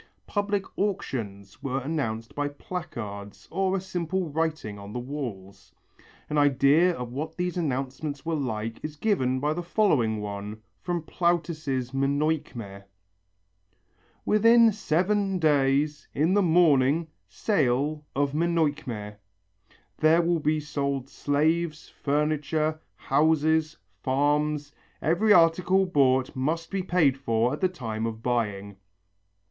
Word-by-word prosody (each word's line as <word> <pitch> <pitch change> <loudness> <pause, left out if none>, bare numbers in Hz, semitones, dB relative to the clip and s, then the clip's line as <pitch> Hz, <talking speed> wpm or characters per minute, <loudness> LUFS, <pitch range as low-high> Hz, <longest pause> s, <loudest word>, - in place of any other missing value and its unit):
Public 205 -1 -1 0.2
auctions 105 - -3
were 135 -1 -2
announced 125 -6 -3
by 145 0 -1
placards 105 - -7
or 195 0 +1
a - - -1
simple 180 -2 -3
writing 155 -10 -2
on 100 +1 -9
the 125 - -3
walls. 110 -8 -7 0.6
An 150 - 0
idea 145 +5 +4
of 125 -1 -6
what 155 +4 -5
these 180 0 -2
announcements 140 -2 -3
were 165 - -1
like 115 -6 -3
is 155 -1 -5
given 130 -9 +1
by 150 +3 0
the 175 - -3
following 150 - +1
one 105 +1 -6 0.2
from 175 -2 -2
Plautus' 155 -7 -1
Menœchme: 135 -7 -1 1.4
"Within 230 +2 +6
seven 195 +1 0
days, 150 -1 +2
in 160 +6 +2
the 205 - +4
morning, 160 -3 +4 0.2
sale 150 - 0
of 140 0 +1
Menœchme. 145 -10 -1 0.8
There 160 +2 +5
will 170 0 +1
be 155 +1 +1
sold 140 -3 -3
slaves, 155 +3 0
furniture, 150 +1 -1 0.2
houses, 155 +2 +2 0.2
farms. 145 +3 0 0.3
Every 190 +7 +2
article 180 +2 +5
bought 130 -6 +2
must 160 +6 -2
be 195 -1 -1
paid 165 -7 +2
for 115 -1 +1
at 150 - -5
the 185 - +3
time 115 -10 -4
of 110 0 -6
buying." 105 -5 -2
150 Hz, 120 wpm, -26 LUFS, 130-170 Hz, 1.4 s, Within